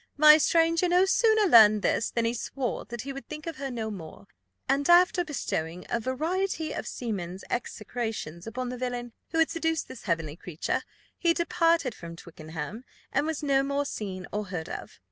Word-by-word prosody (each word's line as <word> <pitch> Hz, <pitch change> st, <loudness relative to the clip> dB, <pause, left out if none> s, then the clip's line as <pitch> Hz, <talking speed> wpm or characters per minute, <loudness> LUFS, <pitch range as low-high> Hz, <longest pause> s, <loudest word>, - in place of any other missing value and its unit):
My 305 Hz, +1 st, +9 dB
stranger 330 Hz, +2 st, +3 dB
no 360 Hz, +2 st, +5 dB
sooner 440 Hz, +2 st, +4 dB
learned 215 Hz, -, +7 dB
this 210 Hz, -, +1 dB
than 235 Hz, -1 st, -1 dB
he 230 Hz, -, +1 dB
swore 245 Hz, +1 st, -3 dB
that 240 Hz, -1 st, -6 dB
he 275 Hz, +3 st, -5 dB
would 275 Hz, -, -9 dB
think 305 Hz, 0 st, -7 dB
of 330 Hz, -3 st, -5 dB
her 275 Hz, 0 st, -4 dB
no 225 Hz, -3 st, -3 dB
more; 160 Hz, -, -9 dB, 0.4 s
and 280 Hz, +2 st, +1 dB
after 355 Hz, +1 st, +6 dB
bestowing 180 Hz, -, -3 dB
a 235 Hz, -, +1 dB
variety 320 Hz, -, -1 dB
of -, -, -5 dB
seamen's' 190 Hz, -6 st, -4 dB
execrations 220 Hz, -7 st, -4 dB
upon 250 Hz, +2 st, -4 dB
the 250 Hz, 0 st, -6 dB
villain 245 Hz, -2 st, -4 dB, 0.2 s
who 325 Hz, -, -3 dB
had 325 Hz, -1 st, +3 dB
seduced 325 Hz, -1 st, -1 dB
this 245 Hz, -, -11 dB
heavenly 165 Hz, -5 st, -1 dB
creature, 175 Hz, -2 st, -3 dB, 0.4 s
he 335 Hz, -2 st, +3 dB
departed 330 Hz, -5 st, +2 dB
from 170 Hz, -3 st, -9 dB
Twickenham, 160 Hz, +5 st, -8 dB, 0.3 s
and 285 Hz, +3 st, +1 dB
was 320 Hz, -1 st, -3 dB
no 275 Hz, -2 st, +3 dB
more 280 Hz, +1 st, -1 dB
seen 190 Hz, -8 st, -5 dB
or 210 Hz, 0 st, -2 dB
heard 180 Hz, -4 st, -5 dB
of. -, -, -7 dB
250 Hz, 185 wpm, -28 LUFS, 205-320 Hz, 0.4 s, My